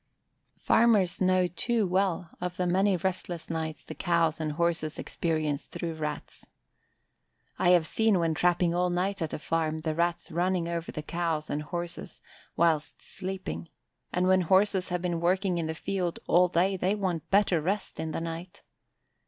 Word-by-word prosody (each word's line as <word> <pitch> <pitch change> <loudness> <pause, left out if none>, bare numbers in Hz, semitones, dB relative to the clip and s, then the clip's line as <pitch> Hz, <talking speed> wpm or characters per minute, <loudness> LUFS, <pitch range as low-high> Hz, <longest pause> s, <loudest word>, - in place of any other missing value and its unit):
Farmers 210 -7 +3
know 185 0 +4
too 215 +6 0
well 185 -2 0
of 180 0 -3
the 180 - 0
many 190 +2 +2
restless 175 -2 -3
nights 160 -1 -3
the - - -8
cows 170 -3 +1
and 155 -1 -2
horses 165 -1 0
experience 155 -3 -1
through 170 -1 -5
Rats. 150 -1 -5 1.2
I - - +4
have 175 -3 +5
seen 220 +2 +2
when 165 -2 +1
trapping 175 +1 +2
all 180 +1 +1
night 190 +2 -1
at 160 - -2
a - - -3
farm 160 0 -1
the 155 0 -1
Rats 170 +2 -1
running 175 +1 0
over 170 -1 -3
the 155 - -5
cows 165 -2 -2
and 145 - -1
horses 175 +3 -5 0.4
whilst 160 -3 +1
sleeping: 185 - -5 0.4
and 180 +1 +1
when 185 0 +4
horses 190 +1 +3
have 180 0 -2
been 170 -2 -1
working 180 0 +1
in 160 - -2
the 160 - -3
field 180 0 -2
all 180 +1 +5
day 180 +3 +2
they 185 +3 +1
want 185 -6 -2
better 195 -4 +3
rest 195 +6 -2
in 160 - -3
the 165 - -3
night. 170 +2 -7
175 Hz, 170 wpm, -28 LUFS, 165-185 Hz, 1.2 s, have